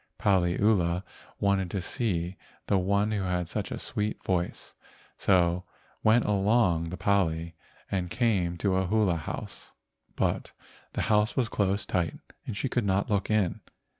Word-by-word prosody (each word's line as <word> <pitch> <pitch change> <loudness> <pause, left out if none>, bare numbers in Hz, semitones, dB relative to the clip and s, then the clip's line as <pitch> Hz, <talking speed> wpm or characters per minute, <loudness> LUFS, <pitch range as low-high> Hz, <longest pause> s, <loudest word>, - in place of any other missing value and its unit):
Paliula 90 -1 +2 0.4
wanted 100 -2 +1
to 95 - -2
see 90 -3 -2 0.3
the 100 - +2
one 100 +3 +1
who 105 -2 0
had 90 -2 -1
such - - -3
a - - -4
sweet 105 +1 -3
.voice, 90 -2 -2 0.4
so 90 -2 +2 0.4
went 110 +2 +5
along 100 -5 +2
the 90 - -5
pali 85 -3 +1 0.4
and 90 -3 -1
came 95 -7 +1
to 95 +1 +1
a 95 -1 +1
hula 105 -3 +2
house, 80 - -6 0.4
but - - -1 0.4
the - - -1
house 105 0 +2
was 120 -3 +1
closed 100 -2 0
tight 85 -3 0 0.3
and 100 - -4
she 135 - -1
could 125 -2 0
not 100 +1 0
look 100 -2 +1
in. 105 -5 +1
95 Hz, 150 wpm, -28 LUFS, 90-105 Hz, 0.4 s, went